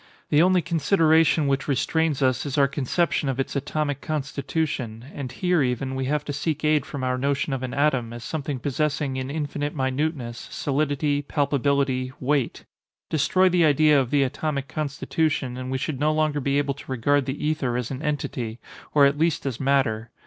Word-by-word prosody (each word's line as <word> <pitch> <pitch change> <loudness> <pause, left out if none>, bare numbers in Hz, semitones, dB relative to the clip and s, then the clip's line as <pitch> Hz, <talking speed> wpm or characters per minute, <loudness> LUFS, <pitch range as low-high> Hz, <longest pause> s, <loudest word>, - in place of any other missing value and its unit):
The 150 - +5
only 180 0 +4
consideration 165 -1 +3
which 140 0 0
restrains 150 +1 +1
us 130 -1 +2
is 145 -2 -3
our 140 -1 +5
conception 140 +2 0
of 135 0 -2
its 135 - -2
atomic 145 +1 -2
constitution; 140 -5 -3
and 135 -3 -5
here, 180 0 +1
even, 130 +1 -1
we 130 0 -2
have 150 +2 -1
to 145 - -3
seek 155 +2 -2
aid 150 -2 +2
from 135 -2 -5
our 125 0 0
notion 140 +1 0
of 135 - -2
an 130 -1 -4
atom, 135 -5 +1
as 120 0 -8
something 145 -2 -3
possessing 140 +1 -1
in 130 0 -3
infinite 145 0 -3
minuteness, 130 -2 -2
solidity, 145 0 0
palpability, 140 -2 0
weight. 140 -1 -1 0.5
Destroy 185 +5 +3
the 180 -1 +3
idea 150 -1 +5
of 125 - -3
the 140 0 +3
atomic 140 +1 -2
constitution 145 -1 -1
and 130 0 -5
we 130 - -1
should 130 0 -3
no 150 +1 +2
longer 155 -1 +1
be 140 0 0
able 140 -1 +1
to 135 -1 -11
regard 135 +3 +1
the 135 +2 -3
ether 135 -6 0
as 125 0 -3
an 135 +1 -5
entity, 125 -6 -3 0.4
or 145 -2 +7
at 140 +1 +2
least 165 -2 +1
as 130 -5 -3
matter. 130 -5 +1
140 Hz, 185 wpm, -24 LUFS, 130-150 Hz, 0.5 s, or